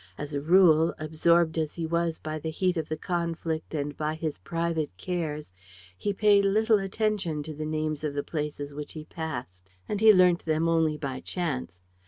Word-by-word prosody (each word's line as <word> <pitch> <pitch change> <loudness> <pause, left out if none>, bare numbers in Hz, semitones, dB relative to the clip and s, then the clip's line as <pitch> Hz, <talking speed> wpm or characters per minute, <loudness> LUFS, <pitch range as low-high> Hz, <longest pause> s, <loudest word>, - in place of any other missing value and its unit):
As 145 0 -6
a 140 - -1
rule, 165 0 +5
absorbed 160 +1 +2
as 155 -2 -2
he 165 - -3
was 170 0 0
by 155 0 -5
the 160 - -4
heat 180 +3 0
of 160 -2 -3
the 155 - -2
conflict 165 -2 -3
and 145 -1 -2
by 155 0 -2
his 160 - -4
private 165 - -2
cares, 150 - -4 0.4
he 205 - -2
paid 205 0 +4
little 215 +2 +3
attention 195 -6 -1
to 155 +1 -6
the 155 +1 -5
names 155 -1 -2
of 150 -2 -2
the 145 - -1
places 150 -2 -4
which 150 0 -7
he 155 -1 -8
passed; 120 - -6 0.2
and 210 0 -2
he 220 0 +9
learnt 180 -3 +4
them 160 +1 +1
only 160 -2 +2
by 135 -3 -4
chance. 130 - -4
160 Hz, 190 wpm, -27 LUFS, 150-170 Hz, 0.4 s, he